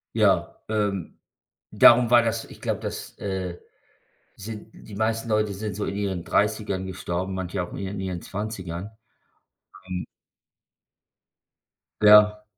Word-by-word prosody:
Ja, - - +2
ähm, 105 -4 -2 0.5
darum 120 0 +7
war 120 - +8
das 115 - -1
ich - - -14
glaube, - - -1
das, - - -6
äh 95 -3 -3 0.8
sind 110 +1 -8
die 105 - -12
meisten 110 +2 -1
Leute 105 -1 +1
sind 105 0 -5
so 105 - -2
in 100 - -3
ihren 95 -4 -2
30ern 105 -3 0
gestorben, 95 0 -4
manche 95 0 -3
auch 85 - -9
in - - -6
ihren 95 0 -4
ihren 90 -2 -4
20ern. 100 -2 -5 1.0
Und 90 -1 -4 2.0
Ja. 105 0 +7
100 Hz, 130 wpm, -25 LUFS, 95-105 Hz, 2.0 s, war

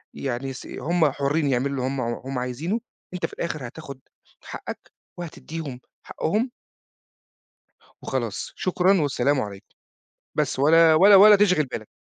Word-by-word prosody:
يعني 135 0 -4
س 130 - -10
هم 165 -3 0
حرّين 145 +2 0
يعملوا 130 +2 +1
اللي 135 -2 -3
هم 130 +1 -2
هم 125 +2 -4
عايزينُه، 140 - -2 0.3
أنت 180 - -2
في - - -7
الآخر 155 -6 -4
هتاخد 140 0 -10 0.4
حقَّك - - -8 0.3
وهتديهم 160 -5 -7 0.3
حقُّهم 220 +9 -1 1.5
وخلاص، - - -4
شكرًا 185 0 +2
والسلام 140 -1 +1
عليكم، 100 -2 -9 0.6
بس - - -1
ولا 160 +3 +6
ولا 195 +5 +7
ولا 210 +1 +9
تِشغِل 185 -7 +3
بالك. 110 -4 -7
150 Hz, 130 wpm, -24 LUFS, 130-175 Hz, 1.5 s, ولا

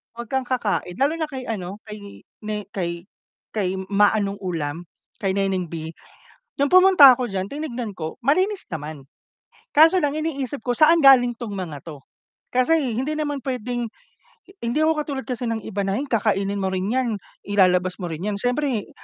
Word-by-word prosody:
Huwag 235 -1 -8
kang 265 -1 -1
kakain. 210 -8 -1
Lalo 285 +4 +2
na 315 - -2
kay 265 -3 -6
ano, 200 -1 -5
kay 210 -1 -9 0.5
ne 210 -1 -3
kay 170 -2 -3 0.5
kay, 190 -4 -1 0.2
'Ma 205 +1 +4
anong 200 -1 -1
ulam,' 165 -3 -4 0.3
kay 195 -4 -1
Neneng 195 -3 0
B. 160 -1 -5 0.7
Nung 280 +3 +1
pumunta 370 -7 +9
ako 245 0 -2
diyan, 195 -1 -3
tinignan 255 -7 -4
ko 160 -1 -5
malinis 375 +8 +1
naman. 150 -3 -6 0.7
Kaso 325 +5 +6
lang 290 +1 0
iniisip 285 -4 -3
ko 245 -1 0
saan 325 +3 +5
galing 260 -4 +6
'tong 230 -4 -6
mga 170 -7 -5
'to. 145 -4 -9 0.5
Kasi 255 +6 +3 0.2
hindi 285 +5 -1
naman 290 -2 -2
puwedeng 245 -2 -3 0.8
hindi 235 +6 0
ako 315 +1 +4
katulad 275 -2 -4
kasi 245 -1 -3
ng 225 -1 -2
iba 200 -2 -3
na 195 - -1
ay 280 - -2
kakainin 200 -3 0
mo 190 - 0
rin 190 +1 -1
'yan, 255 -1 +1 0.4
ilalabas 185 -2 +2
mo - - -3
rin 160 0 -6
'yan. 210 -1 -1
Siyempre, 245 0 -1
225 Hz, 175 wpm, -23 LUFS, 190-275 Hz, 0.8 s, pumunta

